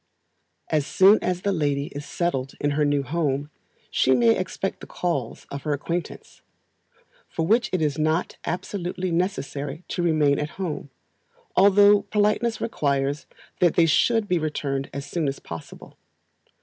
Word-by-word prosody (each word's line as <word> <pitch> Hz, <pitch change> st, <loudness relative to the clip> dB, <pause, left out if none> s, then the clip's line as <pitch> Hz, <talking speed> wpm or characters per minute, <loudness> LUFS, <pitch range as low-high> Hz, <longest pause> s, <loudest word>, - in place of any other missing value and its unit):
As 150 Hz, -1 st, +1 dB
soon 195 Hz, +3 st, +5 dB
as 180 Hz, 0 st, -1 dB
the 200 Hz, -, +1 dB
lady 145 Hz, -5 st, 0 dB
is 145 Hz, 0 st, -7 dB
settled 135 Hz, -7 st, -2 dB
in 145 Hz, -, 0 dB
her 150 Hz, +1 st, +1 dB
new 145 Hz, -1 st, +1 dB
home, 145 Hz, 0 st, -1 dB, 0.4 s
she 130 Hz, -, +3 dB
may 115 Hz, -2 st, +4 dB
expect 190 Hz, +1 st, -3 dB
the -, -, -10 dB
calls 150 Hz, -10 st, -3 dB
of 140 Hz, -, -5 dB
her 150 Hz, -, -1 dB
acquaintance; 170 Hz, +4 st, -5 dB, 0.9 s
for 165 Hz, -, -2 dB
which 230 Hz, +6 st, +3 dB
it 185 Hz, -4 st, 0 dB
is 150 Hz, -1 st, -1 dB
not 155 Hz, +3 st, 0 dB
absolutely 180 Hz, 0 st, -3 dB
necessary 160 Hz, -4 st, -2 dB
to -, -, -2 dB
remain 155 Hz, -4 st, +3 dB
at 150 Hz, 0 st, -5 dB
home, 170 Hz, -6 st, -4 dB, 0.7 s
although 205 Hz, +1 st, +6 dB
politeness 215 Hz, +2 st, +1 dB
requires 140 Hz, -6 st, -1 dB, 0.3 s
that 175 Hz, -2 st, +3 dB
they 170 Hz, -, +5 dB
should 225 Hz, +7 st, +3 dB
be 180 Hz, -2 st, +1 dB
returned 140 Hz, -3 st, -2 dB
as 140 Hz, 0 st, -5 dB
soon 155 Hz, +1 st, -2 dB
as 135 Hz, -, -2 dB
possible. 80 Hz, -2 st, -10 dB
155 Hz, 150 wpm, -24 LUFS, 140-185 Hz, 0.9 s, although